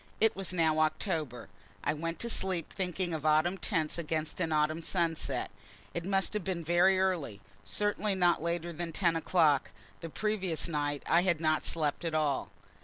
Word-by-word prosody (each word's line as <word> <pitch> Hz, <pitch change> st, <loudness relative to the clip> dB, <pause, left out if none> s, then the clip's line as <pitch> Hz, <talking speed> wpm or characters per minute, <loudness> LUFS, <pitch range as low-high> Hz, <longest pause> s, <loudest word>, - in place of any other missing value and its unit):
It 220 Hz, +1 st, +3 dB
was 195 Hz, -2 st, -2 dB
now 160 Hz, -3 st, +2 dB
October. 155 Hz, -, -1 dB, 0.4 s
I -, -, +1 dB
went 165 Hz, +2 st, -4 dB
to 235 Hz, -, -1 dB
sleep 185 Hz, -5 st, 0 dB
thinking 180 Hz, -2 st, -2 dB
of 155 Hz, -2 st, -4 dB
autumn 155 Hz, +5 st, +2 dB
tints 160 Hz, -4 st, -1 dB
against 160 Hz, +1 st, -3 dB
an 165 Hz, -2 st, 0 dB
autumn 155 Hz, +1 st, +1 dB
sunset. 165 Hz, -1 st, -1 dB, 0.4 s
It 170 Hz, -, -4 dB
must 195 Hz, +1 st, +1 dB
have 210 Hz, -3 st, -2 dB
been 180 Hz, -2 st, -3 dB
very 175 Hz, +3 st, +4 dB
early, 170 Hz, -, -1 dB, 0.2 s
certainly 205 Hz, -1 st, 0 dB
not 175 Hz, -3 st, +3 dB
later 170 Hz, +1 st, -2 dB
than 165 Hz, 0 st, -5 dB
ten 170 Hz, -2 st, +2 dB
o'clock; 155 Hz, -, +2 dB, 0.3 s
the 165 Hz, -, -7 dB
previous 190 Hz, -4 st, -1 dB
night 145 Hz, -3 st, -2 dB
I 170 Hz, -, +4 dB
had 175 Hz, -3 st, +1 dB
not 155 Hz, -1 st, +1 dB
slept 155 Hz, 0 st, +1 dB
at 165 Hz, -2 st, -2 dB
all. 150 Hz, -3 st, 0 dB
170 Hz, 175 wpm, -31 LUFS, 155-185 Hz, 0.4 s, very